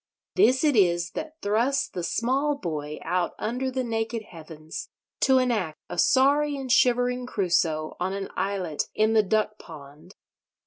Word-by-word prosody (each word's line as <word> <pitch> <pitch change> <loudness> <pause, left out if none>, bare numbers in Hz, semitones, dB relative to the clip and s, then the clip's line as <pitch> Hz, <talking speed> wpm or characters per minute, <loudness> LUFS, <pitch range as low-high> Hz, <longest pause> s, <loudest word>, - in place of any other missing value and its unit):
This 265 -9 +4
it 295 -3 +3
is 175 -4 +3
that 315 +1 -7
thrusts 235 +7 +1
the 180 - -6
small 265 - 0
boy 150 - -4
out 180 -1 -1
under 250 +4 -2
the 260 0 -2
naked 225 -1 -2
heavens, 160 -4 -9 0.3
to 265 -1 +4
enact 220 -11 0
a 175 - -4
sorry 285 - +3
and 265 -2 -4
shivering 245 0 +3
Crusoe 170 -7 0
on 185 +1 -1
an 195 0 -4
islet 185 -5 -2
in 215 +1 +2
the 220 - +6
duck 215 +1 0
pond. 155 +3 -13
215 Hz, 150 wpm, -26 LUFS, 175-255 Hz, 0.3 s, the